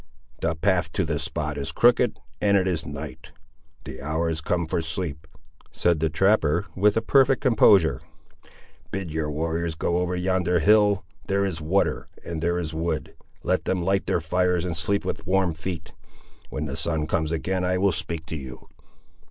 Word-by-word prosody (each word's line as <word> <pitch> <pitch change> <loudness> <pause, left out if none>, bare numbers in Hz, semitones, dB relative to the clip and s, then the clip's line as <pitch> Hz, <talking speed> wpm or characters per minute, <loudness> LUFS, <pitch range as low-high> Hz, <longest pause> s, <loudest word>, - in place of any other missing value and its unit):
"The 80 0 0
path 90 -1 +1
to - - 0
the - - -1
spot 75 -1 -3
is 70 - -3
crooked, - - +3 0.2
and 100 -1 +4
it 95 -1 +1
is 85 -3 -1
night. 75 -2 -8 0.5
The - - -8
hour 80 +3 -1
is 80 -1 -3
come 85 +1 0
for 80 - -1
sleep," 80 -2 -4 0.4
said 85 -3 +1
the 80 +1 +1
trapper, 90 0 +2
with 105 +3 +3
perfect 135 -1 +4
composure. 105 - +5 0.9
"Bid 95 -4 -4
your 80 -1 -2
warriors 80 +2 -2
go 85 +2 0
over 90 0 -1
yonder 90 -1 +1
hill; 105 +2 +4 0.2
there 100 0 +1
is 85 -4 -2
water 90 +6 0 0.2
and 85 -2 -4
there 85 +1 +1
is 80 -2 -3
wood; 80 -4 -2 0.3
let - - 0
them 90 -2 0
light 95 +2 +1
their - - +2
fires 90 +1 +1
and 85 -2 -2
sleep 100 +6 0
with 95 - -4
warm 95 -2 +2
feet. 80 -2 -6 0.6
When 75 - -3
the 70 -2 -4
sun 75 +1 0
comes 80 0 -1
again 90 +3 -1
I 90 0 +1
will 100 +1 +3
speak 85 -2 -3
to 80 - -5
you." 65 -3 -9
85 Hz, 175 wpm, -25 LUFS, 80-95 Hz, 0.9 s, composure